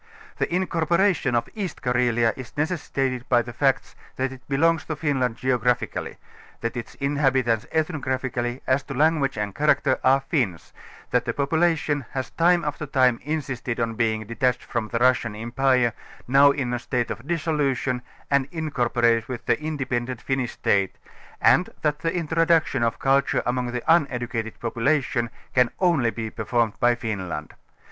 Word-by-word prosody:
The - - -1
incorporation 170 -4 +1
of 115 0 +1
East 195 -7 -5
Carelia 120 -2 +2
is 130 +1 -10
necessitated 135 -6 -2
by 120 -2 +4
the 120 +1 -8
facts 135 0 0 0.2
thatitJielongs 135 +5 0
to 155 - -2
Finlnnd 135 -6 0
geo 130 0 0
graphically, 120 0 -1 0.4
that 115 - -2
its 120 - -6
inhabit^tsethWgraphically, 130 -1 0
as 130 +2 +2
to 140 - -6
lan 155 +3 +3
guage 135 -4 -1
and 105 -1 -2
character, 145 -1 +2
are 135 +1 +4
Finns, 125 - -2 0.4
that - - +2
the - - -1
population 150 0 +1
has 130 -2 -3
time 170 0 +3
after 150 0 -3
time 130 -3 +3
insisted 135 -6 -3
on 115 -1 0
being 110 -1 0
detached 125 +3 0
from 115 -3 -3
the 115 - -2
Russian 120 -3 +2
em 115 +2 -6
pire, 130 -3 +3 0.3
now 140 +3 +6
in 135 -3 -1
a 120 - -1
state 120 -1 -2
of 115 - -7
dissolution, 145 -6 0 0.3
and 140 -1 +3
incorporated 120 -8 +1
with 125 -2 -5
the - - +1
independent 130 -5 -2
Finnish 130 -3 -2
state, 100 -2 +1 0.4
and 180 - +4
that 150 -1 +1
the 165 +1 -1
introduction 165 -4 +2
of 115 -1 +1
culture 135 +1 +2
among 125 0 0
the 125 -1 -4
uneducated 125 -8 +1
population 120 +1 0 0.2
can 125 -2 +4
only 170 -10 +3
be 110 -1 -5
per 110 - -6
formed 115 -1 +1
by 120 0 +4
Finland. 95 -10 -4
130 Hz, 155 wpm, -24 LUFS, 120-150 Hz, 0.4 s, now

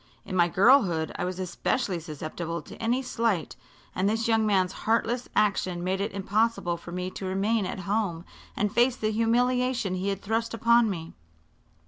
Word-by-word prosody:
In 185 - -5
my 175 -1 +4
girlhood 190 - +4
I 195 - -2
was 180 0 -4
especially 185 +1 -1
susceptible 160 +1 -5
to - - -11
any 240 +3 0
slight, 230 -8 -1 0.4
and 190 +2 +1
this 225 +1 0
young 225 -1 +3
man's 190 -3 +2
heartless 230 +4 -1
action 185 -4 +1
made 190 +2 -1
it 205 +2 -2
impossible 200 -2 0
for 170 - -10
me 180 +1 -3
to 190 - -7
remain 195 +2 0
at 185 - -5
home 195 -4 -1 0.3
and 210 0 0
face 240 +1 +3
the 215 -2 -1
humiliation 245 -1 +1
he 185 +2 -1
had 195 0 -3
thrust 225 +2 -1
upon 235 0 +4
me. 165 -4 -5
200 Hz, 170 wpm, -27 LUFS, 180-230 Hz, 0.4 s, my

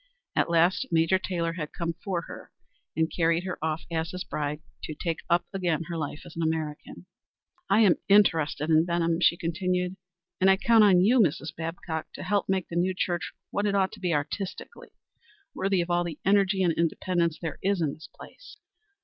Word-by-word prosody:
At - - +2
last 175 +10 +3
Major 165 +3 +3
Taylor 170 -3 -2
had 155 -3 -6
come 170 -1 -3
for 185 -4 -1
her - - -10 0.5
and 160 0 +1
carried 165 0 +2
her 185 -4 -5
off 160 0 -1
as 165 0 -1
his 185 0 -5
bride 150 -2 -4 0.2
to 155 - -6
take 165 +1 -3
up 170 0 +3
again 175 -4 0
her 170 - -3
life 150 -2 -4
as 175 - -12
an 165 - -3
American. 155 - -3 0.6
"I 200 +3 +5
am 200 -5 +5
interested 165 -6 +3
in 160 0 +5
Benham," 170 -1 0
she 170 - +4
continued, 180 +2 -1 0.4
"and 190 - +5
I 190 - +5
count 225 +2 +5
on 190 -3 +6
you, 235 +7 +4
Mrs. 155 -5 +1
Babcock, 165 -1 -5
to - - -7
help 200 +1 0
make 190 -2 0
the 170 - -7
new 180 +2 +1
church 175 -3 -1 0.2
what 205 +1 0
it 200 - 0
ought 190 -1 +2
to - - -11
be 180 -2 -1
artistically 165 +6 -4 0.6
worthy 195 -1 +1
of 170 +1 -3
all 175 0 +2
the 165 -3 -5
energy 195 -1 +3
and 170 -2 +2
independence 170 0 0
there 165 -4 -5
is 195 0 +1
in 155 -4 0
this 155 - -12
place." - - -14
170 Hz, 195 wpm, -27 LUFS, 160-190 Hz, 0.6 s, on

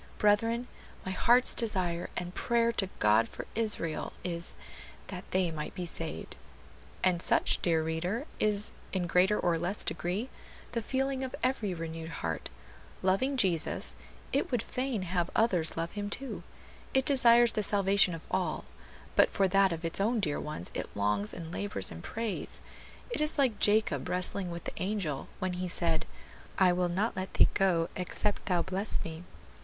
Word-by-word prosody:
Brethren, 225 +4 +2 0.4
my 190 - -2
heart's 240 +6 +5
desire 185 -7 +1
and 180 0 -4
prayer 235 +1 +2
to 195 -5 -1
God 105 +2 +4
for - - -7
Israel 210 -8 0
is, 170 -1 -2 0.5
that 185 -1 -7
they 185 -2 +1
might 150 -1 -5
be 180 - -3
saved." 165 - -4 0.7
And 180 -2 +3
such, - - +2
dear 165 -2 +2
reader, 175 - -2
is, 210 -1 +1 0.2
in 185 -2 -1
greater 185 +4 +3
or 170 -2 +1
less 180 +5 -2
degree, 180 +10 -2 0.4
the 230 - -1
feeling 265 +3 -1
of 260 - -4
every 225 -7 0
renewed 165 0 -6
heart; 80 - -4 0.5
loving 230 +9 +2
Jesus, 180 -8 +1 0.4
it 280 - +1
would 245 -4 0
fain 255 -6 -2
have 175 -1 -1
others 180 -9 +2
love 165 +1 -2
Him 205 -1 -4
too; 265 +5 -4 0.5
it 265 0 +3
desires 240 -4 +6
the 215 - -1
salvation 200 -3 +4
of 165 - -8
all; - - -1 0.5
but - - +6
for 195 - +2
that 195 0 +4
of 165 0 -4
its 165 +4 +2
own 225 +3 +2
dear 150 -8 -1
ones 120 - -5
it - - -4
longs 105 0 0
and 165 -2 -7
labors 200 - -2
and 80 0 -9
prays; 225 -2 -4 0.5
it 305 - -1
is 305 0 0
like 260 -7 +2
Jacob 215 +1 +2
wrestling 180 +1 +1
with 170 0 -6
the - - -5
angel, 185 -8 -2
when 185 -1 -2
he 180 +1 -3
said, 165 -2 +1 0.5
"I 185 -2 +5
will 180 0 +1
not 200 +6 0
let 185 0 -5
thee - - +6
go 175 -4 +2
except 195 +3 -1
thou 175 -2 +2
bless 190 +3 -1
me." 160 +1 -7
185 Hz, 170 wpm, -30 LUFS, 170-220 Hz, 0.7 s, desires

